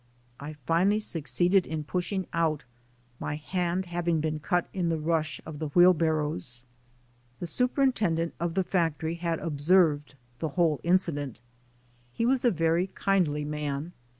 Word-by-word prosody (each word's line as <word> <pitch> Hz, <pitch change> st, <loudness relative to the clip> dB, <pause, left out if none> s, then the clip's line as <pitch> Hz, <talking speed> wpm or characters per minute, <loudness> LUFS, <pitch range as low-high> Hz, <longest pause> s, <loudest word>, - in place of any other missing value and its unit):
I 150 Hz, +2 st, -6 dB
finally 180 Hz, +7 st, +3 dB
succeeded 180 Hz, -1 st, +1 dB
in 155 Hz, -1 st, -3 dB
pushing 180 Hz, +4 st, -2 dB
out, 160 Hz, -3 st, +1 dB, 0.6 s
my 145 Hz, -, -3 dB
hand 180 Hz, +4 st, -2 dB
having 175 Hz, -1 st, 0 dB
been 155 Hz, 0 st, -2 dB
cut 175 Hz, +3 st, 0 dB
in 180 Hz, -3 st, 0 dB
the 165 Hz, -, 0 dB
rush 155 Hz, -3 st, -1 dB
of 150 Hz, -2 st, -8 dB
the 155 Hz, -, -2 dB
wheelbarrows. 155 Hz, -6 st, +2 dB, 0.8 s
The -, -, -4 dB
superintendent 215 Hz, -, +1 dB
of 170 Hz, 0 st, -2 dB
the 190 Hz, -, +2 dB
factorv 165 Hz, -2 st, -1 dB
had 170 Hz, -1 st, -1 dB
observed 150 Hz, -2 st, +2 dB, 0.2 s
the 160 Hz, -, -2 dB
whole 160 Hz, -5 st, +3 dB
incident. 165 Hz, -, 0 dB, 0.8 s
He 230 Hz, -, 0 dB
was 255 Hz, +1 st, +2 dB
a 245 Hz, -, +5 dB
very 165 Hz, -1 st, +1 dB
kindly 175 Hz, -7 st, 0 dB
man. 150 Hz, +2 st, -3 dB
165 Hz, 140 wpm, -28 LUFS, 150-180 Hz, 0.8 s, a